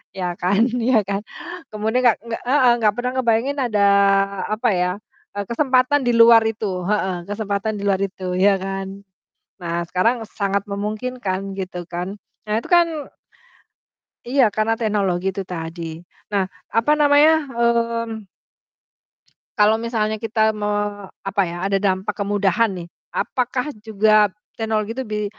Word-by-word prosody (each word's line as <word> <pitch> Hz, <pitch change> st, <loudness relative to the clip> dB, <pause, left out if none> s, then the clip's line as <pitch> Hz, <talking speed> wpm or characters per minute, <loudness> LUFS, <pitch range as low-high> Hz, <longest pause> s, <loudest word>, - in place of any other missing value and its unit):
iya 185 Hz, -1 st, -3 dB, 0.2 s
kan 190 Hz, +3 st, +2 dB, 0.2 s
iya 250 Hz, -1 st, +4 dB
kan? 200 Hz, +1 st, -3 dB, 0.5 s
Kemudian 220 Hz, +3 st, -1 dB
enggak 240 Hz, -3 st, +5 dB
enggak 230 Hz, -1 st, -5 dB
heeh, 260 Hz, -2 st, +5 dB
enggak 210 Hz, -2 st, +3 dB
pernah 250 Hz, +1 st, -2 dB
ngebayangin 235 Hz, +4 st, +1 dB
ada 210 Hz, -3 st, 0 dB, 0.7 s
apa 225 Hz, +3 st, 0 dB
ya, 180 Hz, -1 st, +1 dB, 0.4 s
eee, 205 Hz, -, -2 dB
kesempatan 260 Hz, +2 st, +2 dB
di -, -, +4 dB
luar 230 Hz, 0 st, +8 dB
itu, 195 Hz, -5 st, -3 dB
heeh, 190 Hz, -3 st, 0 dB
kesempatan 205 Hz, 0 st, -2 dB
di 200 Hz, -, -6 dB
luar 195 Hz, -1 st, +1 dB
itu, 195 Hz, -1 st, -4 dB, 0.2 s
iya 200 Hz, +1 st, +5 dB
kan. 195 Hz, 0 st, -4 dB, 0.7 s
Nah, 170 Hz, 0 st, -2 dB
sekarang 225 Hz, +6 st, +1 dB
sangat 200 Hz, -2 st, -2 dB
memungkinkan 205 Hz, -1 st, -3 dB
gitu 185 Hz, -2 st, -5 dB
kan. 180 Hz, +3 st, -5 dB, 0.3 s
Nah, 210 Hz, -, 0 dB
itu -, -, -12 dB
kan 345 Hz, -1 st, +6 dB, 1.4 s
Iya, 265 Hz, +2 st, +3 dB
karena 215 Hz, +1 st, +2 dB
teknologi 195 Hz, -5 st, 0 dB
itu 195 Hz, -, -4 dB
tadi. 165 Hz, 0 st, -5 dB, 0.5 s
Nah, 200 Hz, -1 st, +2 dB, 0.3 s
apa 230 Hz, +6 st, +3 dB
namanya, 290 Hz, +1 st, +6 dB, 0.3 s
mmm 230 Hz, -2 st, 0 dB, 1.3 s
kalau 210 Hz, +1 st, +5 dB
misalnya 220 Hz, -2 st, -1 dB
kita 220 Hz, -1 st, +2 dB
mau 205 Hz, -1 st, -2 dB
apa 195 Hz, +1 st, -3 dB
ya, 170 Hz, +1 st, -6 dB
ada 195 Hz, 0 st, +2 dB
dampak 195 Hz, +1 st, 0 dB
kemudahan 205 Hz, +1 st, +1 dB
nih, 170 Hz, -1 st, -7 dB, 0.3 s
apakah 250 Hz, +3 st, -1 dB
juga 215 Hz, -1 st, +3 dB, 0.3 s
teknologi 220 Hz, -1 st, -1 dB
tuh 265 Hz, -, -3 dB
bi 210 Hz, 0 st, -2 dB
210 Hz, 140 wpm, -21 LUFS, 195-230 Hz, 1.4 s, luar